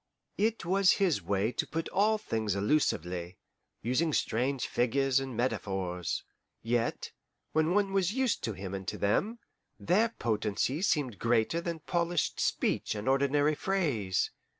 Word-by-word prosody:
It 220 -3 +1
was 190 +2 +4
his 190 -6 +1
way 100 +5 0
to 115 - -2
put 165 +1 -3
all 215 +3 +3
things 110 - -2
allusively, 90 - 0 0.5
using 145 +7 +1
strange 130 +3 0
figures 135 +2 +2
and 135 -4 -5
metaphors. 95 -8 -2 0.4
Yet, 115 +1 -1 0.4
when 160 +3 +2
one 200 -1 +2
was 190 -2 +2
used 260 0 0
to 110 - -2
him 95 -1 -6
and 95 -2 -5
to - - -3
them, 205 - +1 0.4
their 210 +7 +3
potency 110 - -1
seemed 140 - 0
greater 115 +8 +1
than 170 -2 -4
polished 170 0 -1
speech - - 0
and 105 +2 -5
ordinary 140 +2 +3
phrase. 145 - 0
135 Hz, 140 wpm, -30 LUFS, 105-175 Hz, 0.5 s, was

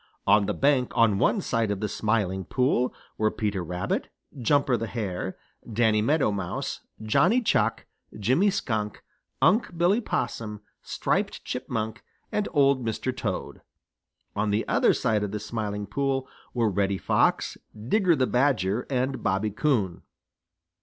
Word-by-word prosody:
On 105 -2 +4
the - - -1
bank 135 -3 +2
on 110 -4 +4
one 200 - +2
side 115 - 0
of 100 -1 -1
the 105 - -1
Smiling 105 -4 0
Pool 125 +3 +1 0.3
were 110 0 +3
Peter 105 -4 -2
Rabbit, 90 +2 -2 0.3
Jumper 135 +1 +2
the 115 -1 -2
Hare, 95 -5 -4 0.3
Danny 110 -1 +3
Meadow 140 0 +2
Mouse, 95 -3 -3 0.2
Johnny 175 - +4
Chuck, 115 - +1 0.3
Jimmy 130 - +3
Skunk, 110 - -2 0.4
Unc' 200 -4 +3
Billy 180 +7 +3
Possum, 105 - -3 0.2
Striped - - -1
Chipmunk 115 -2 -3 0.3
and 210 - 0
Old 140 -3 +3
Mr. 115 +3 -2
Toad. 105 -7 -4 0.7
On 105 +1 0
the 105 +2 0
other - - +3
side 110 -2 +1
of 105 - -1
the 105 +2 -4
Smiling 105 -2 -3
Pool 135 +4 -1 0.3
were 115 -2 +2
Reddy 100 0 +1
Fox, - - +1 0.2
Digger 170 - +2
the 130 -3 +2
Badger, 125 -5 +1
and 130 0 -1
Bobby 105 +1 0
Coon. 105 - 0
115 Hz, 140 wpm, -26 LUFS, 105-135 Hz, 0.7 s, On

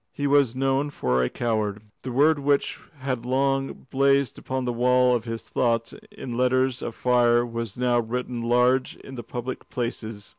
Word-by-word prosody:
He 145 - -4
was 140 -4 +3
known 135 +2 +1
for 65 - 0
a 60 - +1
coward. 110 -3 -2 0.2
The 130 - -5
word 145 +4 +4
which 140 0 +1 0.2
had 130 -3 -2
long 135 +2 -1
blazed 140 -1 +2
upon 130 -1 -3
the 120 - -1
wall 125 +1 +3
of 115 -1 -3
his 115 -1 -5
thoughts 115 -2 0 0.2
in 120 -2 -7
letters 130 0 +1
of 115 - -5
fire 120 -1 +3
was 115 -3 -5
now 125 -1 +2
written 120 +1 -3
large 125 +2 +2
in 135 - -12
the 125 - -6
public 120 +2 -6
places. 115 -4 -5
125 Hz, 175 wpm, -25 LUFS, 115-130 Hz, 0.2 s, word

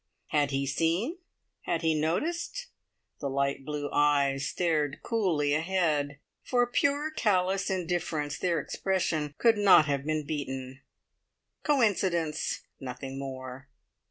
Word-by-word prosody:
Had 145 -2 +2
he 135 0 -1
seen? 170 - 0 0.5
Had 165 -1 -1
he 160 -1 +3
noticed? 310 - -1 0.5
The 140 - -2
light 140 0 0
blue 150 0 -3
eyes 140 -2 +2
stared 150 -1 0
coolly 170 -11 +1
ahead. 155 -4 0 0.2
For 245 -1 +2
pure 285 +5 +1
callous 195 -6 +1
indifference 170 -5 -1
their 175 -2 +1
expression 160 -6 -1
could 225 -3 +4
not 195 -6 +7
have 140 -2 -1
been 155 0 -1
beaten. 135 -3 -5 0.8
Coincidence! 190 - +1 0.2
Nothing 135 +1 -6
more. 130 0 -7
155 Hz, 115 wpm, -29 LUFS, 140-190 Hz, 0.8 s, not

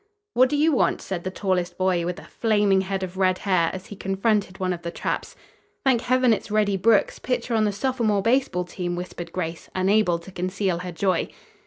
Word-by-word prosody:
"What 255 +1 +5
do 295 - 0
you 310 +2 +4
want?" 270 - +2
said 180 -3 -5
the 185 - -2
tallest 185 -2 -1
boy, 185 -2 +1
with 180 +1 -3
a - - -10
flaming 205 -4 +2
head 190 0 -3
of 185 0 -6
red 185 -1 +2
hair, 185 -5 +2
as 190 0 -7
he 205 - -9
confronted 195 0 0
one 185 -1 0
of 170 - -7
the 170 - -4
tramps. - - -3 0.5
"Thank 255 -4 +4
heaven 255 -1 +3
it's 215 - -4
Reddy 210 -1 +2
Brooks, 205 +2 +3
pitcher 250 -1 -2
on 220 -1 +3
the 210 - +1
sophomore 215 -2 0
baseball 235 -6 +2
team!" 175 0 -4
whispered 175 -1 -6
Grace, 165 -2 -4
unable 190 -1 +3
to 170 +3 -12
conceal 185 0 -1
her 180 0 -5
joy. 185 +1 0
190 Hz, 205 wpm, -24 LUFS, 180-215 Hz, 0.5 s, What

